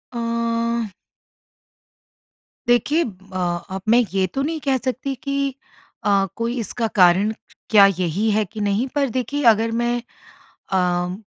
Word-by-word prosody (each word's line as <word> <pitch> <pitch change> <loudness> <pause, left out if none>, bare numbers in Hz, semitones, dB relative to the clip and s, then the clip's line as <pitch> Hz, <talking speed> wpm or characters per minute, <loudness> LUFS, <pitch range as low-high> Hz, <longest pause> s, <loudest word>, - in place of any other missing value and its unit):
अ 230 -2 -1 1.7
देखिए, 285 +8 +3
अ, 190 -3 -8 0.3
अब 190 0 -5
मैं 240 +2 +6
ये 190 -1 +2
तो 270 - -1
नहीं 315 +3 -2
कह 265 -1 +3
सकती 260 +2 -3
कि 275 -2 -1 0.5
अ, 200 -1 +3
कोई 230 +2 -2
इसका 230 +1 -2
कारण 185 +3 +5 0.4
क्या 205 -2 +8
यही 185 +5 0
है 215 +1 +2
कि 215 +3 -10
नहीं 205 +5 0
पर 280 -3 +1
देखिए 260 +4 -2
अगर 225 +1 0
मैं 240 0 0 0.7
अ, 180 -1 +1
230 Hz, 135 wpm, -21 LUFS, 195-255 Hz, 1.7 s, क्या